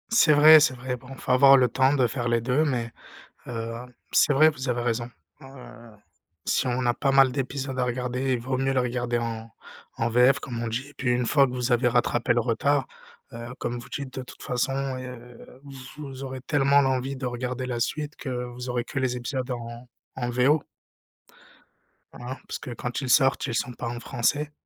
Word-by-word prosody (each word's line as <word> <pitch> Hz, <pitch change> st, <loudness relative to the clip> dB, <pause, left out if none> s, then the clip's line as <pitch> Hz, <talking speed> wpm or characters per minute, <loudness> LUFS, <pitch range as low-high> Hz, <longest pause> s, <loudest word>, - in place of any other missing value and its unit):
C'est 220 Hz, -9 st, +5 dB
vrai, 155 Hz, +2 st, +9 dB
c'est 145 Hz, -3 st, +3 dB
vrai. 125 Hz, 0 st, -4 dB
Bon 125 Hz, -, -17 dB
il -, -, -12 dB
faut -, -, -2 dB
avoir 135 Hz, +2 st, +7 dB
le 125 Hz, -1 st, +4 dB
temps 130 Hz, +2 st, +2 dB
de 130 Hz, -4 st, +3 dB
faire 120 Hz, 0 st, -3 dB
les 120 Hz, -1 st, +1 dB
2, 125 Hz, +6 st, +1 dB
mais, 120 Hz, -5 st, -2 dB, 0.6 s
heu, 115 Hz, -1 st, -4 dB, 0.4 s
c'est -, -, +4 dB
vrai, 155 Hz, +3 st, +6 dB
vous 135 Hz, -3 st, -6 dB
avez 120 Hz, -1 st, 0 dB
raison, 120 Hz, 0 st, -2 dB, 0.3 s
heu, -, -, -11 dB, 1.0 s
si -, -, +1 dB
on 125 Hz, 0 st, -1 dB
a 120 Hz, -, +2 dB
pas 135 Hz, -, 0 dB
mal 135 Hz, -1 st, +5 dB
d'épisodes 135 Hz, 0 st, -4 dB
à 125 Hz, -, +2 dB
regarder, 125 Hz, +2 st, -2 dB
il -, -, -1 dB
vaut 130 Hz, +2 st, -2 dB
mieux 135 Hz, 0 st, +1 dB
le 130 Hz, -, +2 dB
regarder 120 Hz, -1 st, -1 dB
en 115 Hz, -1 st, -5 dB, 0.5 s
en 115 Hz, -, 0 dB
VF 125 Hz, +4 st, +4 dB
comme 120 Hz, -3 st, -5 dB
on 120 Hz, -, -2 dB
dit 125 Hz, +5 st, -4 dB
et 145 Hz, -, -17 dB
puis 130 Hz, -2 st, -1 dB
une 120 Hz, 0 st, +1 dB
fois 140 Hz, +2 st, +4 dB
que 125 Hz, -, -6 dB
vous 125 Hz, 0 st, -1 dB
avez 120 Hz, +1 st, +3 dB
rattrapé 120 Hz, 0 st, +1 dB
le 120 Hz, -, +2 dB
retard, 130 Hz, +4 st, +1 dB, 0.5 s
heu, 115 Hz, 0 st, -7 dB
comme 120 Hz, 0 st, -3 dB
vous 120 Hz, -, -11 dB
dites, 140 Hz, -2 st, -6 dB
de -, -, -4 dB
toute 125 Hz, -, -13 dB
façon, 125 Hz, +2 st, -1 dB, 0.3 s
heu, 125 Hz, 0 st, -11 dB, 0.4 s
vous 135 Hz, -2 st, -7 dB
aurez 130 Hz, -1 st, -6 dB
tellement 140 Hz, 0 st, +3 dB
l'envie 135 Hz, 0 st, -1 dB
de 130 Hz, 0 st, -4 dB
regarder 125 Hz, +1 st, -3 dB
la 120 Hz, -2 st, -3 dB
suite 150 Hz, +4 st, -3 dB
que -, -, -7 dB, 0.2 s
vous 125 Hz, +1 st, -8 dB
aurez 120 Hz, -1 st, -1 dB
que 135 Hz, -, -5 dB
les 130 Hz, -2 st, 0 dB
épisodes 130 Hz, +1 st, -4 dB
en 120 Hz, 0 st, -6 dB, 0.3 s
en 120 Hz, -, -2 dB
VO. 130 Hz, +5 st, +2 dB, 1.5 s
Hein. 125 Hz, +2 st, -7 dB
Parce -, -, -5 dB
que 130 Hz, -, -8 dB
quand 120 Hz, +2 st, -4 dB
ils 130 Hz, -, -4 dB
sortent, 135 Hz, +1 st, +4 dB
ils 120 Hz, -, -3 dB
sont 120 Hz, +2 st, -1 dB
pas -, -, -6 dB
en 120 Hz, 0 st, -4 dB
français, 145 Hz, +5 st, -1 dB
125 Hz, 210 wpm, -25 LUFS, 120-135 Hz, 1.5 s, vrai